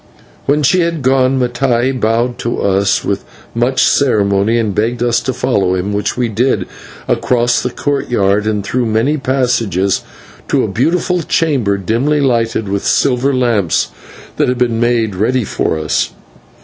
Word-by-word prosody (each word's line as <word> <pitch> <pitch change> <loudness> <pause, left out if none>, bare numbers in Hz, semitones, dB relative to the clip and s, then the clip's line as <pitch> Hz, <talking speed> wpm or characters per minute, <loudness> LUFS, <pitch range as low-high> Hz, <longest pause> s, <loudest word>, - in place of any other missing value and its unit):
When 145 +2 +2
she 180 +7 +3
had 165 -4 -1
gone, 130 0 +2
Mattai 125 0 +1
bowed 115 +2 0
to 120 - -2
us 100 0 +1
with - - -2 0.3
much 120 +3 +1
ceremony, 105 -4 +2
and 110 -3 0
begged 115 +4 -1
us 120 -1 +2
to 130 - -2
follow 110 -7 0
him, 95 +3 -2
which 105 +3 -2
we 125 -1 +1
did, 120 +5 0 0.4
across 120 +1 +1
the 125 - -2
courtyard 110 -8 0
and 105 -2 -1
through 120 +4 -1
many 115 +8 +1
passages, 120 - 0 0.5
to - - +1
a - - 0
beautiful 170 - 0
chamber, 140 -11 0
dimly 120 +10 0
lighted 115 -5 0
with 100 0 -2
silver 135 0 +2
lamps, 120 - +1 0.5
that - - +2
had 125 - 0
been 120 -2 0
made 120 -3 +1
ready 115 +6 0
for 80 - -1
us. 80 0 -1
120 Hz, 155 wpm, -15 LUFS, 105-130 Hz, 0.5 s, she